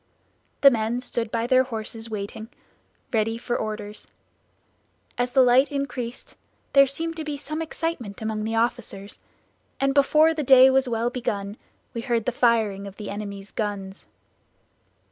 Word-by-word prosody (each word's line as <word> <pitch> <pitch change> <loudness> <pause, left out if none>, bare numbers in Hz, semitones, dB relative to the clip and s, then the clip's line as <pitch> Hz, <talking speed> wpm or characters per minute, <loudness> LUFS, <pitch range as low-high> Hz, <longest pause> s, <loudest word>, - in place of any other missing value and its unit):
The 275 - +9
men 230 0 0
stood 235 -2 -3
by 230 +1 -1
their 255 +1 +5
horses 225 -1 -6
waiting, 215 +1 -6 0.6
ready 225 0 +1
for 240 +1 -3
orders. 215 -1 -5 1.1
As 245 0 0
the 260 +1 +5
light 255 +3 +4
increased 255 -4 -5 0.4
there 275 0 +7
seemed 330 +4 -4
to 320 - -4
be 300 -2 -4
some 305 +3 -5
excitement 320 -10 -4
among 220 -1 -3
the 225 +1 -2
officers; 225 -4 -2 0.6
and 275 0 +2
before 305 +3 +4
the 310 - -2
day 265 -1 +7
was 265 -1 +2
well 235 +1 0
begun 205 -5 -3 0.4
we 230 - -3
heard 235 -3 -1
the - - +1
firing 220 -5 +1
of 195 - -10
the 210 - -6
enemy's 200 -1 -7
guns. 200 -3 -4
235 Hz, 150 wpm, -24 LUFS, 215-265 Hz, 1.1 s, The